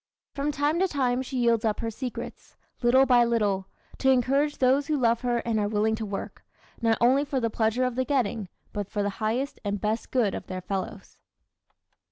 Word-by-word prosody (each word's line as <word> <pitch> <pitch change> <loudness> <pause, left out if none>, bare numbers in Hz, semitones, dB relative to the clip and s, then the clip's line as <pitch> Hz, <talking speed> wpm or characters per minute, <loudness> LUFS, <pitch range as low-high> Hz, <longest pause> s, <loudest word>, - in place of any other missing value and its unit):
From 285 +1 -1
time 295 +3 0
to 380 - +3
time 260 -6 0
she 260 0 -5
yields 235 -2 +2
up 215 -2 0
her 230 -1 -2
secrets, 250 +2 -7 0.3
little 260 +2 +5
by 245 -2 +5
little, 205 -5 0 0.3
to 265 - +3
encourage 275 +3 +2
those 270 +2 +3
who 305 - +1
love 235 -3 +2
her 240 -1 0
and 225 -2 0
are 205 - +1
willing 215 +1 +1
to 220 -1 -3
work, 195 -1 -6 0.4
not 225 -1 +2
only 260 +4 +4
for 280 -2 -2
the 230 -2 -1
pleasure 225 +3 +1
of 255 -1 0
the 260 +2 0
getting, 235 -8 -1 0.2
but 205 -2 -4
for 205 -1 -1
the 205 - -1
highest 240 +6 -1
and 205 -1 -2
best 215 +3 -2
good 235 -7 +1
of - - -6
their 185 0 -5
fellows. 190 0 -5
240 Hz, 205 wpm, -26 LUFS, 215-265 Hz, 0.4 s, little